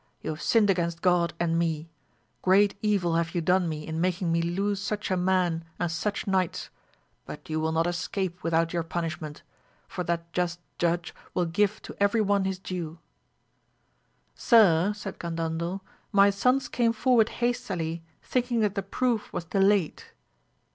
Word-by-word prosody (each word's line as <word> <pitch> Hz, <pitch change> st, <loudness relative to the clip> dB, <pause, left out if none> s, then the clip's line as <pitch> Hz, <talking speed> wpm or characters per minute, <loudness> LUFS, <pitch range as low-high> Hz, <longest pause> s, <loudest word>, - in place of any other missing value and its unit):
You -, -, -2 dB
have 155 Hz, -, -7 dB
sinned 215 Hz, -3 st, +4 dB
against 170 Hz, -2 st, -2 dB
God 175 Hz, -3 st, +3 dB
and 165 Hz, -1 st, +1 dB
me; 165 Hz, -2 st, -1 dB, 0.5 s
great 195 Hz, +2 st, +4 dB
evil 200 Hz, -6 st, +1 dB
have 165 Hz, 0 st, -1 dB
you -, -, +2 dB
done 180 Hz, +1 st, +2 dB
me 155 Hz, -1 st, -5 dB
in 160 Hz, 0 st, -3 dB
making 180 Hz, -1 st, 0 dB
me 165 Hz, 0 st, +2 dB
lose 195 Hz, +4 st, -1 dB
such 205 Hz, 0 st, -3 dB
a -, -, +3 dB
man 180 Hz, -2 st, +1 dB
and 175 Hz, -2 st, -1 dB
such 200 Hz, +6 st, -2 dB
knights, 190 Hz, -4 st, -1 dB, 0.6 s
but -, -, -9 dB
you 155 Hz, -, 0 dB
will 160 Hz, 0 st, 0 dB
not 165 Hz, +1 st, +1 dB
escape 175 Hz, +1 st, -2 dB
without 165 Hz, 0 st, +1 dB
your 170 Hz, -, +1 dB
punishment, 165 Hz, -2 st, -5 dB, 0.4 s
for 180 Hz, -, -4 dB
that 170 Hz, 0 st, -3 dB
just 175 Hz, -1 st, -1 dB, 0.2 s
Judge 170 Hz, 0 st, 0 dB, 0.2 s
will 180 Hz, -, +2 dB
give 205 Hz, +5 st, 0 dB
to -, -, -9 dB
every 200 Hz, +3 st, +3 dB
one 200 Hz, -2 st, +2 dB
his 190 Hz, -1 st, -1 dB
due. 175 Hz, -4 st, -5 dB, 1.4 s
Sir, 200 Hz, -5 st, +5 dB
said 210 Hz, -, -7 dB
Gandandel, 170 Hz, +2 st, -3 dB, 0.3 s
my 200 Hz, -1 st, +6 dB
sons 250 Hz, +6 st, +2 dB
came 230 Hz, -2 st, +1 dB
forward 230 Hz, -1 st, +3 dB
hastily 175 Hz, -9 st, -2 dB, 0.2 s
thinking 245 Hz, -2 st, 0 dB
that 210 Hz, -2 st, +1 dB
the 200 Hz, -, -1 dB
proof 230 Hz, +3 st, -1 dB
was 175 Hz, -, -4 dB
delayed. 195 Hz, 0 st, +2 dB
180 Hz, 160 wpm, -27 LUFS, 165-200 Hz, 1.4 s, my